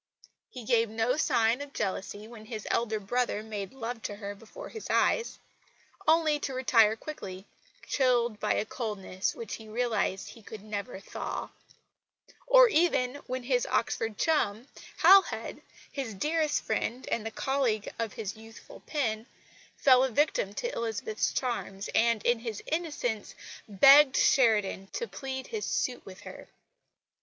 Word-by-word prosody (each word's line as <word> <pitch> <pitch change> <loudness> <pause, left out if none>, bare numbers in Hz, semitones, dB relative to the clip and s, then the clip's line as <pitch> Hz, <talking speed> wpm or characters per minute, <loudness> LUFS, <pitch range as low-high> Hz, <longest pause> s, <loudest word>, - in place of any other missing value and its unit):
He 250 - -9
gave 230 -1 +2
no 225 +3 0
sign 230 -4 +2
of 285 -1 -8
jealousy 205 +2 -4
when 225 -2 -12
his 215 -2 -6
elder 220 -2 0
brother 215 +1 -1
made 205 -3 -5
love 240 -2 -6
to 205 - -5
her 200 -1 -6
before 215 +2 -11
his 445 - -8
eyes 465 - +1 0.7
only 315 -2 +4
to 270 -2 -4
retire 225 -4 +4
quickly, 200 -8 -8 0.4
chilled 240 -5 +2
by - - +1
a - - 0
coldness 205 -5 -3
which 230 -3 -7
he 220 - -12
realised 220 -4 -1
he 230 - -13
could 215 -1 -10
never 210 0 -5
thaw; 195 - -5 1.0
or - - +8
even 295 - +2
when 255 0 -3
his - - +1
Oxford 220 -2 -1
chum, 245 -7 +1 0.4
Halhed, 390 0 +5 0.3
his 255 -7 -4
dearest 305 +6 0
friend 250 +3 -2
and 230 - 0
the 225 - -3
colleague 240 -3 -1
of 225 -3 -2
his 210 -2 -5
youthful 225 +1 -13
pen, 230 -6 -1 0.5
fell 260 -2 +6
a 265 - +1
victim 240 -6 +1
to 485 - -3
Elizabeth's 220 -1 -2
charms, 220 -6 -3
and, 230 -1 +2
in 240 -1 +3
his 225 -3 -6
innocence, 295 -10 -3 0.3
begged 275 +7 +7
Sheridan 210 -6 +3
to 475 - -3
plead 265 -6 -6
his 440 -2 -4
suit - - -1
with - - -11
her. - - -11
230 Hz, 150 wpm, -29 LUFS, 215-270 Hz, 1.0 s, or